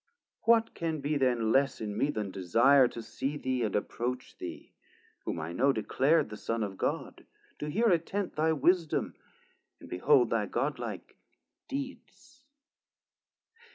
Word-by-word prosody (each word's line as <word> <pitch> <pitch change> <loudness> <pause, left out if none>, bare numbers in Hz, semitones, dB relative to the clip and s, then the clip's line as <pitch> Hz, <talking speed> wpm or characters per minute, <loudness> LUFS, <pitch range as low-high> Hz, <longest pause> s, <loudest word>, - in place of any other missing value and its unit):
What 230 0 +4
can 160 -2 -2
be 145 +2 -1
then 120 -5 +2
less 135 +2 +2
in 105 -2 -4
me 140 - +1
then 105 -8 -3
desire 120 +9 +4
To 115 -1 -7
see 135 +6 -3
thee 130 -3 -1
and 110 -4 -1
approach 125 +4 -3
thee, - - -8 0.5
whom - - -3
I 80 +2 -4
know 135 +9 +3
Declar'd 140 +6 +2
the 105 - -6
Son 115 +1 -2
of 100 -2 -4
God, - - -3 0.4
to 150 - -3
hear 225 +10 +2
attent 180 +2 0
Thy 160 +1 +2
wisdom, 165 +2 +1 0.7
and - - -12
behold 450 - +3
thy - - +1
God - - -1
like - - -7 0.5
deeds? 275 0 -7
140 Hz, 150 wpm, -30 LUFS, 115-165 Hz, 0.7 s, What